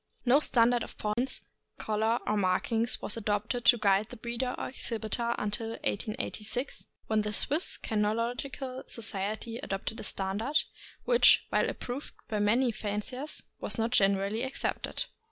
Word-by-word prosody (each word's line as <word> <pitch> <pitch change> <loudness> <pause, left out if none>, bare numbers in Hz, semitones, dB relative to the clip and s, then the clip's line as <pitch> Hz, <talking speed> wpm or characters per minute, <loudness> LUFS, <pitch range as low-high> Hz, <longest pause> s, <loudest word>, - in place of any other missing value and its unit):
No 255 +4 +6
standard 240 -4 +3
of - - -7
points, 225 +5 -1 0.3
color, 220 +2 +1
or 210 - +1
markings 215 +5 +1
was 210 - 0
adopted 215 +3 -1
to 240 - +7
guide 200 -1 +3
the 245 - -9
breeder 240 +2 -2
or - - -3
exhibitor 235 -1 -2
until 210 +2 -2 0.2
1886, 220 +3 -3 0.2
when 220 -1 +2
the 210 0 -2
Swiss 295 - +3
THE - - -10
ST. - - -6
BERNARD. 230 +4 0
555 275 - -7 0.4
Kynological - - -26
Society 220 +1 -2
adopted 195 +3 -4
a - - -6
standard, 205 +9 0 0.5
which, 485 -1 +6
while - - +2
ap - - -6
proved 255 +4 -5
by 215 - -1
many 235 +5 +3
fanciers, 225 +7 -4 0.2
was - - -2
not 225 +1 0
generally 200 0 +2
accepted. 265 - -1
225 Hz, 155 wpm, -30 LUFS, 210-245 Hz, 0.5 s, to